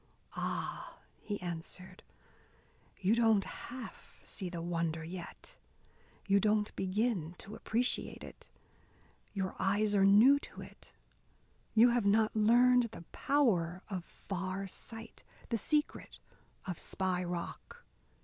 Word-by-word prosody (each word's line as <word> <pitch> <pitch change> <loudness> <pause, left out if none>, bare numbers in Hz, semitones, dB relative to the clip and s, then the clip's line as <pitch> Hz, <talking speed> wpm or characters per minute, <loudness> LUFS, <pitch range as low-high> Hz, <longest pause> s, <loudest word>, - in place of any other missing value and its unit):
"Ah," - - -4 0.2
he 205 -1 -4
answered, 180 +1 -7 1.0
"you 195 +3 +3
don't 225 -3 +4
half 250 -1 -9
see 185 -3 -6
the 175 -1 -5
wonder 165 -1 -2
yet, 180 - -9 0.7
you 200 0 +4
don't 210 +1 +1
begin 190 -3 -1
to 210 - -8
appreciate 240 +4 -1
it. - - -12 0.9
Your 190 -1 -2
eyes 205 +2 +2
are 200 -1 +4
new 220 +9 +7
to - - -11
it. - - -13 0.8
You 230 +2 +7
have 235 -4 +2
not 215 +2 +3
learned 245 +3 +5
the 170 - -9
power 185 -11 +1
of 185 -4 -3
far 190 +1 -5
sight, 225 +4 -10 0.3
the 230 - +1
secret 300 +7 -1 0.5
of 180 -3 -4
Spy 185 -1 -1
Rock. 175 -1 -6
200 Hz, 120 wpm, -33 LUFS, 180-225 Hz, 1.0 s, new